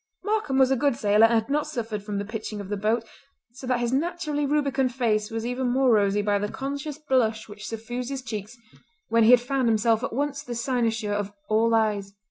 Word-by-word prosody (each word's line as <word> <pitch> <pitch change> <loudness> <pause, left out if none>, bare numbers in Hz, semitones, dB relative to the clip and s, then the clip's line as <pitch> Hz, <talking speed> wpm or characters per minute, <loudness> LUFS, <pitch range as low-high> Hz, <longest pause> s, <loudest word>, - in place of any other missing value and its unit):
Markam 415 -10 0
was 265 -1 +5
a - - +4
good 280 0 +1
sailor 210 0 +4
and 230 - +1
had 220 - -15
not 300 +1 +1
suffered 225 -8 -4
from 205 0 -4
the 200 - -2
pitching 215 0 -5
of 200 -1 -7
the 205 - -1
boat, 215 +3 0 0.5
so 255 +1 -10
that 250 -1 +1
his 240 +1 -1
naturally 300 -1 -1
rubicund 275 -3 +1
face 215 -4 +1
was 225 0 -4
even 250 +1 -1
more 260 0 +3
rosy 205 -1 +2
by 205 -1 +1
the 205 +1 -2
conscious 280 +2 -5
blush 250 -7 0
which 210 0 -9
suffused 240 +3 -5
his 270 -2 -4
cheeks 220 0 -6 0.5
when 230 0 +4
he - - +5
had 250 0 +8
found 260 0 0
himself 225 +1 +2
at - - -2
once 280 +3 -2
the 245 -4 -6
cynosure 230 -3 -1
of 205 -1 -2 0.2
all 225 +1 +3
eyes. 205 -3 0
235 Hz, 220 wpm, -25 LUFS, 215-270 Hz, 0.5 s, had